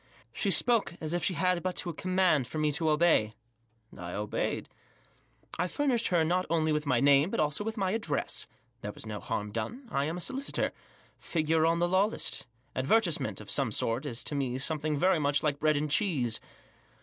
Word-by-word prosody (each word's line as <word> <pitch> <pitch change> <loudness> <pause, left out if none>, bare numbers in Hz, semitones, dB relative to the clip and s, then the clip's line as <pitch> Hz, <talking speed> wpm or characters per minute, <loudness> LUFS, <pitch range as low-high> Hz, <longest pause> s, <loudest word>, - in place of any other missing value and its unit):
She 200 - -1
spoke 225 -3 +3
as 155 0 -2
if 175 - -1
she 185 - +1
had 180 0 +1
but 185 +1 -2
to 175 - -1
command 185 -6 +2
for 155 - -6
me 155 -1 +2
to 160 +2 +1
obey; 150 -9 +3 0.6
I 90 0 -7
obeyed. 105 +1 -2 0.9
I - - +1
furnished 250 +1 0
her 175 -3 +3
not 180 +3 0
only 160 -1 +1
with 150 -1 -1
my 130 -3 +3
name, 140 +4 +5
but, - - -2
also, 150 +4 +1
with 220 +1 -4
my 190 -2 0
address. 200 -10 -1 0.3
There 105 - -4
was - - -11
no 105 -1 -5
harm 105 +1 -3
done. 230 - -5
I 140 +1 +1
am 160 +3 -3
a - - -4
solicitor; 270 +7 -2 0.5
figure 160 0 +1
on 165 +1 +2
the 175 +1 +2
law 185 +3 +4
list; 215 - -2 0.3
advertisement, 170 +6 +1
of - - -7
some - - +1
sort, 120 +6 -1
is 115 -3 -3
to - - -2
me 130 -3 -1
some 150 +4 -1
thing 155 0 -1
very 180 +2 +3
much 145 -1 +1
like 145 -2 0
bread 155 -1 +3
and 150 0 -2
cheese. 145 - +1
155 Hz, 200 wpm, -30 LUFS, 140-185 Hz, 0.9 s, name